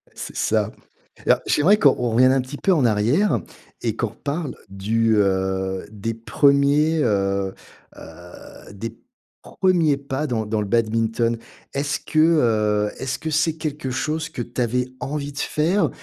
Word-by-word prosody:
C'est - - -7
ça. - - +1 0.5
Alors, - - +4
j'aimerais 185 +8 +4
qu'on 145 -9 +5
on 120 -1 -1
revienne 130 +3 +5
un 135 - +2
petit 130 +3 -8
peu 190 - +2
en 145 -7 +2
arrière 120 - +2 0.4
et 115 -2 -1
qu'on 115 - -1
reparle 140 +7 -4
du, 110 +3 +1
heu, 95 -1 0
des 110 +2 -4
1ers, 140 +6 +3
heu 100 -2 0 0.4
heu, 85 +4 -13
des 110 +3 -7 0.4
1ers 170 -6 +1
pas 140 +2 -3
dans 110 -5 -1
dans 110 0 -1
le 105 - -3
badminton. 115 +1 +1 0.4
Est-ce 145 +1 -1
que, 155 - -1
heu, 110 -10 +3
est-ce 130 0 -3
que 160 - -4
c'est 155 +1 +1
quelque 150 -4 -4
chose 155 +5 -2
que 155 - -5
tu 120 +1 -4
avais 125 +1 0
envie 145 +2 -4
de 140 - -14
faire 160 +2 +1
125 Hz, 155 wpm, -22 LUFS, 110-150 Hz, 0.5 s, qu'on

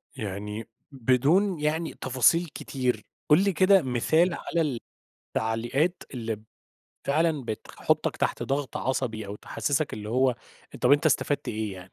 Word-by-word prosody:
يعني 105 +1 -5 0.2
بدون 145 - +2
يعني 155 +2 -1
تفاصيل 130 +7 +3
كتير، 130 -5 -2 0.3
قُل 155 +6 +6
لي 200 - +2
كده 185 +3 +5
مثال 155 +7 +2
على 170 - -1
ال 140 -7 -1 0.6
التعليقات 120 +10 0
اللي 115 -4 -4 0.6
فعلًا 150 -1 +1
بتخ 110 -2 -6
بتحطك - - 0
تحت - - -1
ضغط 140 0 -2
عصبي 120 -4 -2
أو 100 +1 -6
تحسسك 145 +6 -1
اللي 105 0 -6
هو، 130 +2 +3 0.5
طَب - - +4
أنت 145 +2 +4
استفدت 145 -1 +1
إيه 110 -2 -2
يعني؟ 90 0 -11
130 Hz, 140 wpm, -27 LUFS, 115-155 Hz, 0.6 s, قُل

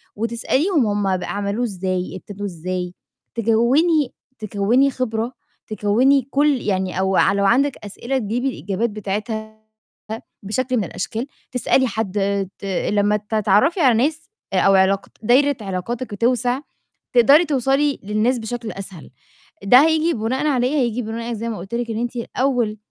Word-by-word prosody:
وتسأليهم 245 - +1
هُم 200 -2 0
ب 180 - -6
عَملوه 205 +4 -2
إزاي، 185 -2 -3
ابتدوه 205 +2 -7
إزاي 180 +1 -4 0.4
تجوّني 245 +7 +2 0.3
تكوّني 215 +6 +2
خِبرة 235 -1 -2 0.3
تكوّني 230 +6 +3
كل 285 -2 +2
يعني 190 -2 -1
أو 190 0 +1
ع 195 - +4
لو 200 0 +1
عندِك 270 +6 +3
أسئلة 240 +6 -3
تجيبي 240 +3 -1
الإجابات 205 0 -2
بتاعتها 215 +2 -5 0.8
بشكل 255 +5 -1
من 210 - +1
الأشكال، 220 - -4 0.2
تسألي 255 +1 +2
حد 215 -3 -3 0.4
ت - - -8
لمّا 205 +2 +1
تتعرّفي 210 - +2
على 255 -7 +5
ناس 315 +1 -4 0.2
آآ 185 - +3
أو 195 +1 +4
علاقات 190 +1 +2
دايرة 275 +4 +4
علاقاتِك 205 +5 -4
بتوسَع، 245 +4 +1 0.5
تقدري 275 +8 +6
توصلي 275 0 +1
للناس 215 +5 +1
بشكل 230 0 -5
أسهل، 190 -7 -9 0.5
ده 225 +6 +7
هييجي 320 +1 +2
بُناءً 255 +7 -1
على 250 -4 +2
إيه، 275 - -2
هييجي 245 -3 0
بُناءً 230 +1 -4
زي 230 +1 -4
ما 220 - -4
قُلت 195 +6 -6
لِك 235 -1 -2
إن 220 - -3
أنتِ 240 +1 -3
الأول 240 -2 -1
225 Hz, 145 wpm, -21 LUFS, 200-255 Hz, 0.8 s, ده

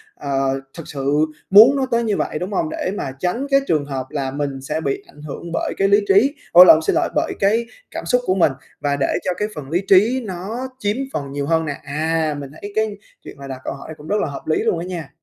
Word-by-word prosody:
ờ, 135 -1 -1 0.2
thực 165 - -8
sự 145 +2 +1 0.2
muốn 220 +8 +8
nó 270 -1 +1
tới 235 0 +2
như 215 -3 0
vậy, 155 - -2
đúng 185 +3 -4
hông? 160 -4 0
Để 185 - -3
mà 135 - -3
tránh 205 - -1
cái 275 - +6
trường 150 -3 +1
hợp 135 -2 -4
là 135 -2 -3
mình 140 -1 -3
sẽ 150 +4 -3
bị 140 -3 -2
ảnh 150 - -16
hưởng 155 +3 -7
bởi - - -1
cái 195 - +3
lý 200 +1 +5
trí 230 +10 +4 0.2
ủa 175 - +10
lộn, 160 -3 +7
xin 160 - 0
lỗi, - - +1
bởi - - 0
cái 220 +4 +2 0.3
cảm - - -6
xúc 250 0 +2
của 185 - +1
mình 170 -6 +4 0.3
và 145 0 0
để 135 - +2 0.2
cho - - +1
cái 210 - -1
phần 145 -3 -7
lý 175 +4 +1
trí 225 +7 +4
nó 205 +8 -5
chiếm 210 -1 -1 0.2
phần 140 -2 -4
nhiều 140 0 -3
hơn 160 +2 +1
nè. 145 -2 -4
À, 155 +2 -1
mình 140 -1 -8
thấy 205 - -6
cái 220 -2 0 0.3
chuyện - - -11
mà 140 - -9
đặt 130 -1 -7
câu - - -3
hỏi 160 - -9
cũng 150 - -12
rất 210 - +1
là - - 0
hợp 140 - -8
lý 155 - +2
luôn 170 - +1
á 170 - -4
nha. 170 -6 -6
160 Hz, 260 wpm, -20 LUFS, 140-200 Hz, 0.3 s, ủa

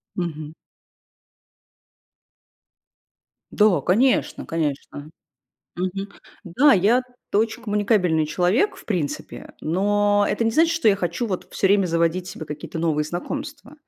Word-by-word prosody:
Мгм. 155 -4 -4 3.0
Да, 205 -8 +3
конечно, 235 - +1
конечно. 150 -2 -4 0.7
Мгм, 185 +2 -3 0.4
да. 250 +11 +4
Я-то 245 +2 +1
очень 225 +2 -1
коммуникабельный 205 -7 +1
человек 190 - +1
в - - -14
принципе, 175 -9 -4
но 205 +4 +2
это - - -1
не 225 - +2
значит, 325 +7 +3
что 330 -9 +2
я 200 - +4
хочу 175 +5 -2
вот 185 -4 -4
всё 195 - +1
время 200 -1 +3
заводить 170 +2 0
себе 160 - -7
какие-то 150 +2 -7
новые 155 -2 +1
знакомства. 280 - -6
195 Hz, 115 wpm, -22 LUFS, 165-225 Hz, 3.0 s, да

